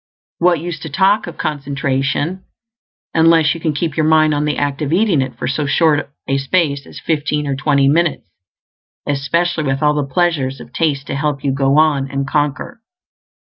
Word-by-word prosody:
What 175 -2 +3
use 170 0 -5
to 160 - -7
talk 195 +7 +2
of 175 - -8
concentration 140 +4 -2 0.7
unless 160 -1 +4
you 165 - -7
can 160 - 0
keep 150 +1 -3
your 155 - +1
mind 155 -1 +4
on 145 0 0
the 150 - -1
act 145 +1 -2
of 150 -1 -2
eating 165 -9 +2
for 115 - -5
so 145 +2 -1
short 150 0 +2 0.2
a 135 0 +1
space 140 -1 0
as - - -10
fifteen 150 -1 -1
or 140 -1 -1
twenty 140 0 +2
minutes, 160 - +1 0.8
especially 155 +4 0
with 135 +1 -1
all 150 0 +4
the 145 -2 -3
pleasures 140 -5 0
of - - -13
taste 145 -4 0
to - - -5
help 140 -1 -2
you? 140 - +1
Go 135 +1 +1
on, 145 -3 +2
and 135 0 -3
conquer. 145 - -2
150 Hz, 180 wpm, -17 LUFS, 140-165 Hz, 0.8 s, unless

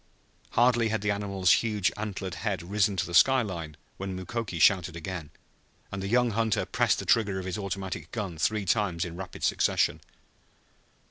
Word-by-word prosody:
Hardly 120 -1 +4
had 110 -1 -1
the 105 0 +1
animal's 100 -2 +1
huge 105 -7 +2
antlered 100 -3 -4
head 100 -4 -2
risen 100 +2 +1
to 90 - +1
the 85 - -8
sky 130 +8 +6
line 85 -7 -6 0.2
when 95 -1 -4
Mukoki 95 0 -4
shouted 90 +2 +4
again, 85 -2 -6 0.6
and 95 - -4
the 95 - -3
young 120 +2 +3
hunter 110 -1 0
pressed - - +1
the - - -5
trigger 105 -4 +2
of 95 - -4
his 95 +1 -3
automatic 95 -1 -5
gun 95 -8 -4
three 105 +3 0
times 90 -3 +1
in 85 -1 -7
rapid 90 -1 -8
succession. - - +1
95 Hz, 175 wpm, -28 LUFS, 90-105 Hz, 0.6 s, sky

